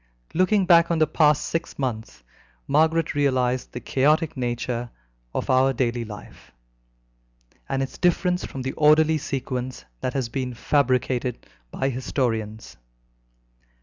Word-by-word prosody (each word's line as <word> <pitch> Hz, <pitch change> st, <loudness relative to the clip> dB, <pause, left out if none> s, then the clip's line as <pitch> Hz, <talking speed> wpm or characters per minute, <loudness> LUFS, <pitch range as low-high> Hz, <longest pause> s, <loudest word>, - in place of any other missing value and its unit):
Looking 185 Hz, +3 st, +3 dB
back 170 Hz, -2 st, +5 dB
on 170 Hz, -, +1 dB
the 155 Hz, -, +4 dB
past 150 Hz, -1 st, +3 dB
six 165 Hz, 0 st, -3 dB
months, 110 Hz, -, -4 dB, 0.4 s
Margaret 160 Hz, +3 st, +2 dB
realized 130 Hz, -3 st, 0 dB
the 125 Hz, -, -6 dB
chaotic 150 Hz, +5 st, +1 dB
nature 120 Hz, -1 st, -3 dB, 0.4 s
of -, -, -3 dB
our 130 Hz, +1 st, +3 dB
daily 120 Hz, -1 st, -1 dB
life, 105 Hz, -1 st, -12 dB, 1.2 s
and 135 Hz, 0 st, 0 dB
its 135 Hz, -, -7 dB
difference 180 Hz, 0 st, +1 dB
from 130 Hz, -, -6 dB
the 130 Hz, -, -2 dB
orderly 155 Hz, +1 st, +4 dB
sequence 130 Hz, -2 st, -4 dB
that 125 Hz, -, -3 dB
has 130 Hz, -3 st, 0 dB
been 125 Hz, 0 st, -4 dB
fabricated 125 Hz, -1 st, 0 dB, 0.2 s
by 135 Hz, -, -1 dB
historians. 110 Hz, -, -3 dB
130 Hz, 125 wpm, -24 LUFS, 125-155 Hz, 1.2 s, back